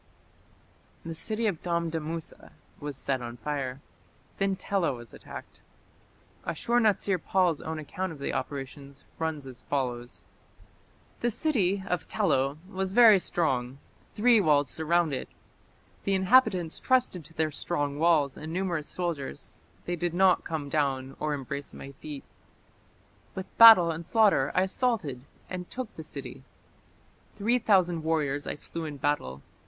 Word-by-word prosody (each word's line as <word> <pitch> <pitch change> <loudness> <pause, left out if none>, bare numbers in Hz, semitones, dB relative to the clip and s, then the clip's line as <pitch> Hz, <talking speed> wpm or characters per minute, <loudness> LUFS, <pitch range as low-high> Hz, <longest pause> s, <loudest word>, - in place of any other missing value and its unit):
The 165 - -4
city 215 +8 -1
of 195 -7 -1
Damdamusa 165 -2 -3 0.3
was 145 -2 -5
set 135 -1 -1
on 120 0 -7
fire. 135 -1 -4 0.6
Then 195 -1 +1
Tela 190 -5 0
was 120 -2 -11
attacked. - - -11 0.8
Ashur 235 +9 0
natsir 205 -4 +2
pal's 180 -5 +2
own 160 0 -4
account 180 +5 -4
of 160 - -9
the 140 - -3
operations 140 +1 -6
runs 160 -3 -2
as 130 -2 -10
follows: 125 -3 -3 0.9
The 240 - +1
city 200 - +1
(of 180 -3 -2
Tello) 145 -9 +1
was 190 -1 -3
very 220 -3 +8
strong; 135 -8 0 0.4
three 230 0 +5
walls 145 -5 +3
surrounded 160 -3 0
it. - - -34 0.7
The 195 - +1
inhabitants 190 -4 +3
trusted 250 -9 +1
to 165 - -14
their 155 -1 0
strong 145 -2 -2
walls 155 -5 +3
and 155 +1 -7
numerous 175 -4 -2
soldiers; 170 -7 -3 0.3
they 175 - -1
did 175 0 -2
not 190 0 +4
come 155 -3 -4
down 135 -3 -1
or 150 -1 -1
embrace 140 +1 -6
my 135 - -9
feet. 140 0 -8 1.1
With 190 0 -7
battle 220 -7 +10
and 165 +1 -5
slaughter 200 - +3
I 185 - +4
assaulted 190 - -1 0.2
and 180 -1 -6
took 255 -3 -6
the 160 - -7
city. 135 -3 -8 1.0
Three 235 +5 +2
thousand 185 -7 +3
warriors 145 -3 0
I - - -2
slew 165 +2 -5
in 150 -2 -6
battle. 70 - -2
160 Hz, 140 wpm, -28 LUFS, 140-190 Hz, 1.1 s, battle